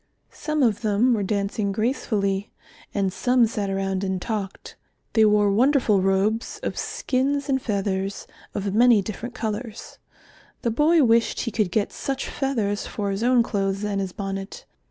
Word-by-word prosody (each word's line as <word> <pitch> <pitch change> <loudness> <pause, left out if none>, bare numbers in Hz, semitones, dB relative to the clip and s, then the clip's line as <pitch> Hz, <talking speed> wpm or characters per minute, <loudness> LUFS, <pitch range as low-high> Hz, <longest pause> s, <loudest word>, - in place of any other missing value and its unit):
Some 305 -2 -1
of 230 -2 +2
them 220 +3 +3
were 215 - 0
dancing 200 0 -1
gracefully, 205 -3 -1 0.4
and 195 -2 -1
some 250 -1 +3
sat 210 -3 -2
around 195 0 -1
and 190 -1 -1
talked. 200 -1 -5 0.4
They 220 -2 +5
wore 210 -1 +4
wonderful 235 -3 +3
robes 195 +4 0
of - - -2
skins 285 - -1
and 265 -1 +1
feathers, 195 -2 -2 0.3
of 200 -1 -2
many 230 -2 +5
different 225 +5 -6
colours. 220 -1 -5 0.6
The 235 - +1
boy 305 +6 +4
wished 230 -1 +3
he 230 - -3
could 210 -3 0
get 205 +3 -1
such 270 -1 -3
feathers 220 -7 -1
for 200 -2 -3
his 195 +2 -3
own 245 0 +4
clothes 195 -2 -1
and 200 -1 -1
his 190 -1 -3
bonnet. 195 0 -6
215 Hz, 155 wpm, -24 LUFS, 195-245 Hz, 0.6 s, They